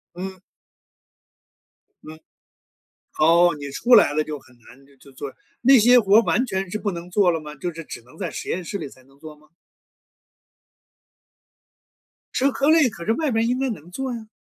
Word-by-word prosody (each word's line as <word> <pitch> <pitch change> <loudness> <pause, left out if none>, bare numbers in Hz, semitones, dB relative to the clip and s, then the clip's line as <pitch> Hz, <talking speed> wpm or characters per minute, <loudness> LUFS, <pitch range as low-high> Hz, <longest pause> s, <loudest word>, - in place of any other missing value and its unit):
嗯。 190 +1 -7 1.6
嗯。 155 0 -11 1.0
哦， 170 +2 +5
你 140 0 -6
出 240 - +3
来 200 -10 +6
了 155 +1 0
就 150 -1 -6
很 125 -1 -22
难 120 +1 -18 0.2
就 140 - -18
做， 135 +1 -8 0.3
那 265 +2 +6
些 245 +3 +6
活 205 0 +5
完 245 +2 +1
全 195 -5 -3
是 215 - -4
不 205 - -2
能 170 -1 -8
做 190 -1 +3
了 165 -2 -2
吗？ 150 -1 -10
就 175 +5 -5
是 165 0 -9
只 120 - -9
能 125 +2 -19
在 190 -4 -3
实 - - -7
验 180 - -3
室 200 - -5
里 185 - -6
才 130 -1 -19
能 135 +1 -24
做 155 -1 -11
吗？ 150 0 -24 2.9
社 275 +2 +2
科 280 +2 0
类， 315 -5 +5
可 170 -5 -10
是 225 - +2
外 305 +1 -1
面 225 -1 +1
儿 - - 0
应 250 +2 -1
该 270 0 -1
能 175 -7 -8
做 260 +5 -4
呀。 225 -2 -8
180 Hz, 205 characters per minute, -22 LUFS, 155-235 Hz, 2.9 s, 来